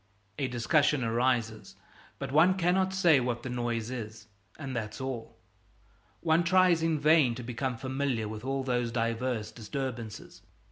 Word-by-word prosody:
A 135 - 0
discussion 135 +3 +2
arises, 115 -1 0 0.4
but - - -5
one 165 +6 +5
cannot 185 +1 +2
say 175 -6 +4
what 120 -1 -2
the 130 - -5
noise 120 -1 -2
is, 110 -3 -7 0.3
and 135 -4 -6
that's 110 0 -4
all. 130 -4 -5 0.8
One 165 +1 +3
tries 180 -1 +4
in 165 -2 +1
vain 150 -5 +4
to 125 - -7
become 125 +1 -3
familiar 130 -3 -2
with 110 +1 -7
all 135 0 -2
those 120 -2 -1
diverse 115 -1 -1
disturbances. 115 0 -6
130 Hz, 145 wpm, -29 LUFS, 115-150 Hz, 0.8 s, one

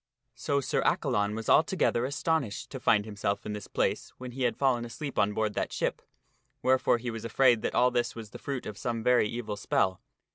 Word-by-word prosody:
So 140 -1 -1
Sir - - 0
Accalon 105 -6 +1
was 110 -1 -5
altogether 155 -7 +3
astonished 140 -4 -1
to 130 - -5
find 105 -4 +3
himself 100 -2 -3
in 105 - -3
this 105 -1 -6
place - - -1
when 125 -1 -7
he 130 +2 -7
had 120 - 0
fallen 130 -4 +2
asleep 140 +4 -5
on 100 +1 +3
board 105 0 -1
that - - -2
ship, - - -2 0.6
wherefore 130 -1 +3
he 120 0 -4
was 115 -1 -6
afraid 120 0 +3
that - - -2
all 125 +1 +4
this 120 -1 0
was 110 -3 -8
the - - -9
fruit 135 -3 -4
of 105 - -7
some 115 -2 -2
very 125 -3 +4
evil 115 -3 -4
spell. 95 -2 0
120 Hz, 210 wpm, -29 LUFS, 105-130 Hz, 0.6 s, all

